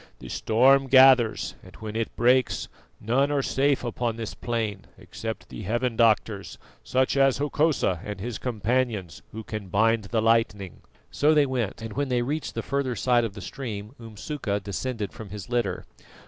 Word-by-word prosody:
"The 65 - -11
storm 135 - +3
gathers, 130 -3 +5
and 95 - -15
when 110 -1 -7
it 115 0 -2
breaks 125 +1 +2 0.3
none 130 +6 +1
are 140 -2 +1
safe 140 0 +1
upon 120 -1 -2
this 115 -2 -5
plain 115 -4 -3
except 110 +2 -7
the - - -8
heaven 120 +4 -1
doctors 110 -3 +1 0.3
such 130 +1 +1
as 135 -1 +4
Hokosa 145 - +1
and 105 -2 -6
his 115 +2 -5
companions 115 -5 -1
who 110 +1 -7
can 105 -2 -6
bind 110 +3 +2
the 110 +3 -1
lightning." 110 -5 +1 0.3
So 155 +2 +3
they 150 -1 +5
went 120 -5 -3
and 110 -1 -6
when 140 +2 -2
they 120 -1 +1
reached 150 +5 -3
the 115 - -3
further 135 -2 -1
side 120 +2 +2
of 110 -3 -4
the 100 - -8
stream 110 -3 -6
Umsuka 110 -1 -4
descended 105 +2 -4
from 110 -3 -9
his 100 0 -8
litter. 115 -7 -1
115 Hz, 170 wpm, -26 LUFS, 105-130 Hz, 0.3 s, gathers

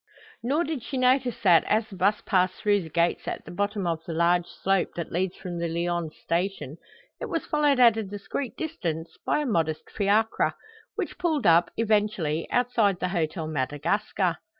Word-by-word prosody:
Nor 280 +8 +1
did 310 -5 -3
she 265 - -5
notice 255 -1 +2
that, 175 -5 +6
as 220 +1 +1
the 200 - -11
bus 200 +3 +2
passed 185 -2 +2
through 205 -1 +2
the 160 - -8
gates 170 +2 0
at - - -4
the - - -9
bottom 205 +1 -2
of 165 -1 -2
the 170 - -4
large 175 +1 +2
slope 195 -1 -1
that 170 - -5
leads 185 +2 -1
from 175 -2 -6
the 170 - -1
Lyons 170 -1 -2
Station, 170 -4 -2 0.4
it - - -4
was 330 - -2
followed 295 -3 +2
at 235 -3 +6
a - - 0
discreet 205 +5 -5
distance 165 - -4
by 300 - +1
a - - -2
modest 160 - -1
fiacre, 210 +2 +1 0.4
which - - -4
pulled 315 -6 0
up, 170 +1 +5
eventually, 205 -8 0
outside 230 -6 +2
the 180 - -1
Hôtel 160 -2 -1
Madagascar. 165 +6 -1
195 Hz, 180 wpm, -26 LUFS, 170-225 Hz, 0.4 s, that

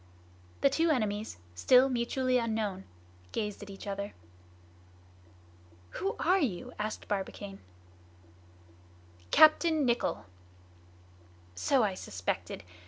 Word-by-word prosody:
The 275 - +5
two 330 +4 +2
enemies, 215 - -1 0.2
still 250 - +5
mutually 255 0 +1
unknown, 220 -5 -2 0.5
gazed 210 -1 -3
at 205 - -9
each 195 +1 -9
other. 200 0 -4 1.8
"Who 400 +4 -2
are 375 +2 +3
you?" 250 - -2
asked 215 +1 -4
Barbicane. 195 0 -4 1.7
"Captain 310 - +6
Nicholl!" 240 -1 0 1.3
"So 255 - +2
I 200 -3 +1
suspected. 95 - -4
225 Hz, 95 wpm, -31 LUFS, 200-265 Hz, 1.8 s, Captain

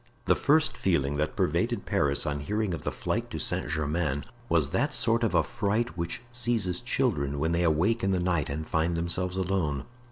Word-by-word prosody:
The - - +5
first 155 +2 +2
feeling 75 -6 0
that 75 +1 -1
pervaded - - 0
Paris 70 -1 +1
on 75 -1 -1
hearing 105 +5 -1
of 85 - -4
the - - -2
flight - - -2
to - - -5
Saint - - 0
Germain, 75 -1 -1 0.3
was 75 -4 +2
that 145 +1 +1
sort 115 0 +2
of 115 - +1
affright 110 +2 0
which 85 +6 -4
seizes 115 -7 +1
children 95 - 0
when 80 +3 0
they 85 +1 +1
awake 90 +8 +2
in 95 - +2
the 95 -2 +1
night 85 -5 0
and 80 +2 -4
find 85 +2 0
themselves 90 +2 0
alone. 90 -8 -1
85 Hz, 190 wpm, -28 LUFS, 75-105 Hz, 0.3 s, The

